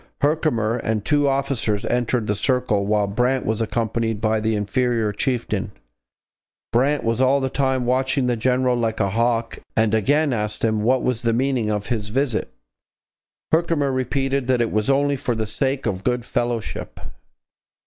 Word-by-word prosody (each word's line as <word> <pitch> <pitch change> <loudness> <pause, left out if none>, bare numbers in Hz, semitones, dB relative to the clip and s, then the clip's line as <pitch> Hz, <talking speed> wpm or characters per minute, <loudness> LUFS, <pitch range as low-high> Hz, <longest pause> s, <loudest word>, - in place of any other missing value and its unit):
Herkimer 145 -7 +1
and 110 -3 -2
two 145 -1 +2
officers 135 -6 0
entered 120 -1 0
the 105 - 0
circle, 105 -2 0
while 105 -1 +2
Brant 125 +6 0
was 110 +1 -1
accompanied 115 -1 -1
by 110 0 +1
the 110 +1 0
inferior 115 +1 0
chieftain. 125 +3 -2 1.0
Brant 140 +5 +2
was 115 +2 0
all 135 +2 +4
the 130 -1 -2
time 130 -2 0
watching 130 +1 +1
the 125 -1 +1
general 125 +2 +1
like 115 -2 -1
a 100 -3 +1
hawk 115 +1 0 0.2
and 110 -1 +2
again 140 +7 +2
asked 105 -2 -3
him 110 -1 +1
what 125 +4 +2
was 125 -2 0
the 115 -1 +1
meaning 125 -2 0
of 105 0 -2
his 110 -4 -2
visit. 125 -1 -1 1.0
Herkimer 160 -4 +2
repeated 135 0 -1
that 130 -1 +2
it 120 -1 0
was 110 +3 0
only 140 +1 +2
for 130 -3 -2
the 110 0 -2
sake 135 +5 -2
of 95 -1 -2
good 125 -1 0
fellowship. 120 -3 -3
120 Hz, 165 wpm, -22 LUFS, 110-130 Hz, 1.0 s, all